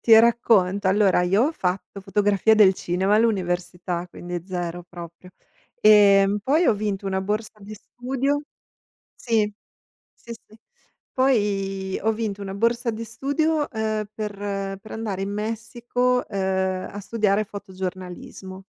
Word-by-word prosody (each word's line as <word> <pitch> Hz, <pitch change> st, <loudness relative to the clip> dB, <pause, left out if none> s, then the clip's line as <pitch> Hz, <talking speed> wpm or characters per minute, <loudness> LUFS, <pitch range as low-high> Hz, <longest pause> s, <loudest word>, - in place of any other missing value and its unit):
ti 225 Hz, -1 st, +7 dB
racconto. 205 Hz, -5 st, +3 dB
Allora 195 Hz, -2 st, +3 dB
io 195 Hz, +6 st, +3 dB
ho 320 Hz, -, -2 dB
fatto 190 Hz, -, -3 dB
fotografia 205 Hz, +2 st, +2 dB
del 200 Hz, -3 st, +6 dB
cinema 185 Hz, +4 st, 0 dB
all'università, 180 Hz, -4 st, -1 dB
quindi 175 Hz, -1 st, -6 dB
zero 175 Hz, -2 st, -4 dB
proprio. 170 Hz, +1 st, -11 dB, 0.5 s
Ehm, 205 Hz, -1 st, +6 dB
poi 310 Hz, +8 st, +2 dB
ho 220 Hz, -, +4 dB
vinto 200 Hz, -1 st, -3 dB
una 190 Hz, 0 st, -1 dB
borsa 215 Hz, +2 st, -3 dB
di 210 Hz, +2 st, -9 dB
studio 265 Hz, +6 st, -2 dB, 0.7 s
sì, 220 Hz, -3 st, 0 dB, 0.6 s
sì, 235 Hz, -, -10 dB
sì. 220 Hz, -1 st, -17 dB, 0.6 s
Poi 195 Hz, -7 st, 0 dB
ho 220 Hz, +1 st, +2 dB
vinto 210 Hz, -2 st, -4 dB
una 195 Hz, -1 st, -5 dB
borsa 235 Hz, +3 st, +1 dB
di 225 Hz, +1 st, -5 dB
studio, 290 Hz, +6 st, -1 dB
ehm, 220 Hz, -1 st, -2 dB
per 200 Hz, -2 st, -4 dB
per 215 Hz, -, -14 dB
andare 210 Hz, -4 st, -3 dB
in 195 Hz, -, -3 dB
Messico, 235 Hz, +4 st, -1 dB
ehm, 190 Hz, -1 st, -1 dB
a 205 Hz, -, -6 dB
studiare 210 Hz, 0 st, +1 dB
fotogiornalismo. 190 Hz, -1 st, -8 dB
205 Hz, 130 wpm, -23 LUFS, 190-225 Hz, 0.7 s, ti